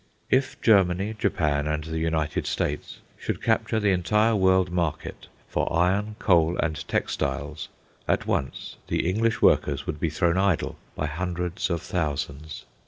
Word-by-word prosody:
If 130 +1 +1
Germany, 100 -1 +3
Japan, 75 -6 +1
and 75 0 -1
the 80 +1 -4
United 80 -2 -1
States 75 - -3 0.2
should - - -3
capture 110 - +1
the 105 -2 +2
entire 105 +5 +2
world 95 -2 +3
market 85 -3 -3 0.2
for - - -1
iron, 95 +6 +1
coal, 85 -3 +3
and 80 -1 -2
textiles, 75 +2 -2 0.4
at - - +1
once 65 - -3
the - - 0
English 110 +5 +1
workers 70 -1 +3
would 75 - -4
be 80 - 0
thrown 85 +3 +1
idle 95 -4 +1 0.2
by 75 - -2
hundreds 90 +3 -2
of 85 -2 -2
thousands. 75 -2 -3
85 Hz, 145 wpm, -25 LUFS, 75-95 Hz, 0.4 s, Germany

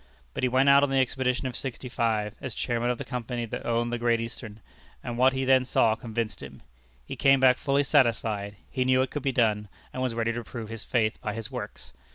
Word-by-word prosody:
But - - -4
he 125 - +2
went 130 +2 +3
out 140 0 +7
on 145 - +2
the 135 - +1
expedition 130 0 0
of 125 - -6
'65, 115 -5 -2
as 130 -3 -5
chairman 120 0 -1
of 125 - 0
the - - -6
company 120 -1 -4
that 115 - -6
owned 120 0 0
the 120 - -2
Great 120 -1 +2
Eastern; 115 -2 -7 0.4
and 120 - -4
what 130 +2 +4
he 130 0 -1
then 130 -1 +5
saw 115 -3 +3
convinced 110 -1 -4
him. - - -11 0.4
He - - -6
came 135 -1 +4
back 130 -1 +5
fully 140 0 +1
satisfied; 115 -7 +1 0.2
he 130 - 0
knew 130 0 +3
it 130 - -5
could 145 - -3
be 135 - 0
done, 110 -4 +1 0.3
and 130 - -4
was 125 -3 -1
ready 115 0 0
to 120 0 -4
prove 115 -1 -7
his 115 -2 -7
faith 110 -2 0
by 105 -1 -3
his 115 -2 -5
works. - - -8
120 Hz, 230 wpm, -27 LUFS, 115-130 Hz, 0.4 s, out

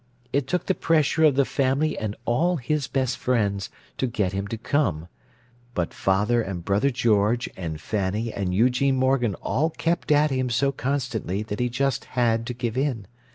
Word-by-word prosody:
It 140 -1 +1
took 180 +5 -1
the 190 - +2
pressure 160 -2 +2
of 145 -4 +4
the 140 0 +3
family 140 +4 +1
and 105 -1 -3
all 165 +10 +2
his 145 0 -1
best 130 -3 -1
friends, 100 -6 0 0.3
to 130 - +1
get 105 -6 -1
him 100 +1 -2
to 115 - -4
come—but 120 - -4
father 105 +5 +2
and 95 -5 -5
brother 105 +7 +2
George 115 -2 +2
and 80 -4 -5
Fanny 105 +5 -2
and 95 -2 -2
Eugene 125 +7 +3
Morgan 130 -5 +2
all 155 +4 +1
kept 170 0 -1
at 150 0 +4
him 130 -1 0
so 135 +4 +2
constantly 125 -7 -2
that 105 -1 -5
he 125 0 +1
just 135 +2 -1
had 115 -1 +2
to 125 - -4
give 120 -1 -3
in. 130 -7 -1
120 Hz, 175 wpm, -25 LUFS, 105-135 Hz, 0.3 s, of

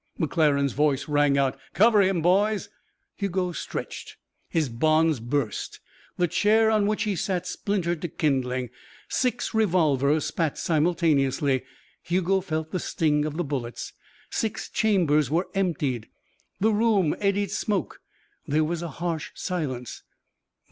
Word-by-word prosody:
McClaren's 145 -4 +2
voice 145 0 +1
rang 145 -1 +3
out: 135 -2 +1 0.2
"Cover 215 0 +5
him, 185 -4 +1
boys." 200 +4 +2 0.5
Hugo 185 -2 -1
stretched. - - -6 0.3
His 160 -3 +1
bonds 155 +4 +2
burst; 120 -1 -3 0.4
the 175 - +2
chair 220 +5 +3
on 210 -2 +2
which 215 0 0
he 210 -3 -1
sat 180 0 -2
splintered 175 -6 -2
to 175 - -2
kindling. 130 -7 -1 0.4
Six 250 -1 -1
revolvers 155 - +2
spat 160 -4 -1
simultaneously. 150 -5 +1 0.4
Hugo 185 +2 +1
felt 160 -3 -3
the 185 - -1
sting 150 -3 +1
of 155 0 -4
the 175 - 0
bullets. 130 -5 -5 0.4
Six 220 -2 -2
chambers 170 -9 +2
were 170 +5 0
emptied. 150 - -1 0.5
The 220 +3 +3
room 210 -7 +2
eddied 200 0 0
smoke. 205 -3 -2 0.5
There 155 +2 +2
was 165 +2 -2
a 170 - -3 0.2
harsh 165 -3 -2
silence. 130 - -4
165 Hz, 130 wpm, -25 LUFS, 145-195 Hz, 0.5 s, Cover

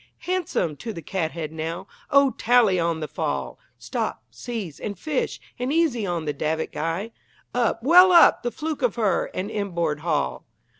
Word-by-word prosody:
Handsome 350 - -1
to 225 -2 -6
the 165 - -8
cathead, 160 -2 -3
now! 160 +1 -4 0.2
O 280 -1 +5
tally 230 -8 +3
on 165 -1 0
the 155 - -3
fall! - - -3 0.2
Stop, - - -3
seize, 215 -11 -6
and 205 -3 -5
fish, 290 - -2 0.2
and 250 +2 -1
easy 295 -10 +1
on 170 -3 -2
the 150 - -1
davit 155 +3 -2
guy. 165 +8 -3 0.4
Up, 230 -2 0
well 360 +6 +8
up, 345 - +7
the 240 - -1
fluke 310 +3 -4
of 245 -4 +1
her, 215 -5 +1
and 195 +4 -3
inboard 170 -8 -1
haul! 150 -3 -1
200 Hz, 165 wpm, -24 LUFS, 165-250 Hz, 0.4 s, well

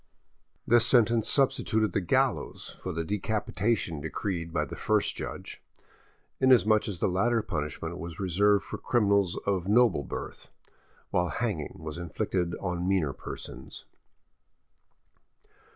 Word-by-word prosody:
This 120 0 +6
sentence 115 -3 +4
substituted 110 -5 +2
the - - +1
gallows 90 - 0
for 95 - -4
the 85 0 -2
decapitation 105 -3 -1
decreed 85 +2 -3
by 75 -2 0
the - - -8
first - - +1
judge, - - -6 0.8
inasmuch 110 -5 +4
as 95 -5 -4
the - - +2
latter 115 +5 +1
punishment 80 -1 -4
was 85 0 -7
reserved 100 +2 +2
for - - -6
criminals 100 -6 +2
of 95 -3 0
noble 110 -7 +4
birth, - - -7 0.6
while 90 0 +1
hanging 105 -12 -3
was 80 -1 -7
inflicted 85 +1 -2
on 90 -2 -3
meaner 90 -8 +1
persons. - - -8
95 Hz, 120 wpm, -28 LUFS, 85-110 Hz, 0.8 s, This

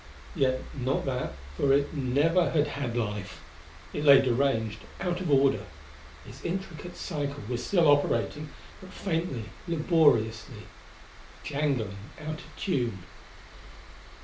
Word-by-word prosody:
Yet 130 -1 +2
not 135 0 -1
that, 125 - -2 0.2
for 135 - +2
it 140 +2 +2
never 150 +6 +2
had 150 -2 +2
had 130 -5 -3
life. 105 -4 -3 0.5
It 150 - -2
lay 140 -2 +9
deranged; 120 -4 +1 0.2
out 180 -1 -1
of 180 - -2
order; 135 -1 +4 0.6
its - - -12
intricate 175 -1 -5
cycle 145 - -4
was 120 0 -3
still 170 -1 +3
operating, 145 +1 +2 0.3
but 185 -1 -11
faintly, 165 - -2 0.2
laboriously. 125 - +2 0.8
Jangling 140 -9 -1 0.2
out 155 0 -5
of - - -15
tune. 120 - -1
140 Hz, 120 wpm, -28 LUFS, 125-160 Hz, 0.8 s, lay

